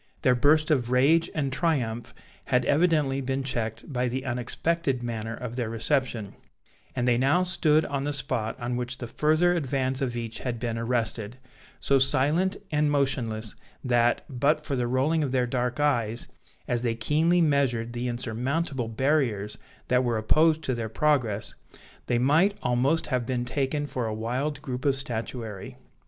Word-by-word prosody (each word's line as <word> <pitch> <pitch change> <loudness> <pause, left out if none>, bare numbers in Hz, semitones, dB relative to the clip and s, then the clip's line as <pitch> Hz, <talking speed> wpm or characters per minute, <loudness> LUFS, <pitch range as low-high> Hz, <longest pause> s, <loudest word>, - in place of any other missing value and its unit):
Their 130 -4 +5
burst 155 +5 +3
of 125 -5 +1
rage 150 +7 +4
and 140 -4 -1
triumph 125 -8 -1 0.3
had 125 -1 +1
evidently 150 -4 +2
been 135 +1 -2
checked 115 0 -4
by 125 0 0
the 130 +2 -3
unexpected 130 +2 -1
manner 115 -1 -4
of 120 0 -6
their 120 -3 -1
reception; 115 -2 -1 0.6
and 125 - 0
they 120 -1 +3
now 145 +8 +3
stood 160 -4 +2
on 140 -1 -2
the 145 - -1
spot 125 -5 -2
on 120 0 -2
which 125 +1 -4
the 125 - -6
further 155 +8 +2
advance 135 -4 -1
of 120 -3 -1
each 115 -1 -5
had 120 -3 -3
been 115 -1 -2
arrested, 115 -1 -2 0.4
so 140 -1 +3
silent 150 +8 +2
and 150 0 +2
motionless, 120 -7 -1 0.3
that, 120 -2 +2
but 150 +3 +1
for 140 - -2
the 125 -2 0
rolling 135 +6 +1
of 140 -4 -1
their 130 -1 +2
dark 125 +1 -2
eyes, 120 -6 +1 0.4
as 120 -1 0
they 115 -2 0
keenly 155 +10 +2
measured 135 -7 +1
the 120 +1 -3
insurmountable 125 +3 -2
barriers 115 -4 0 0.3
that 125 0 +3
were 120 -2 0
opposed 155 +8 +3
to 130 - -1
their 115 -2 -3
progress, 120 -6 0 0.5
they 120 - +2
might 155 +11 +3
almost 130 +6 +1
have 125 -1 -1
been 125 -1 -1
taken 140 +3 -1
for 125 -5 -3
a 110 - -2
wild 125 +7 -3
group 125 -2 -4
of 140 -2 +3
statuary. 115 -5 -4
130 Hz, 165 wpm, -26 LUFS, 120-145 Hz, 0.6 s, Their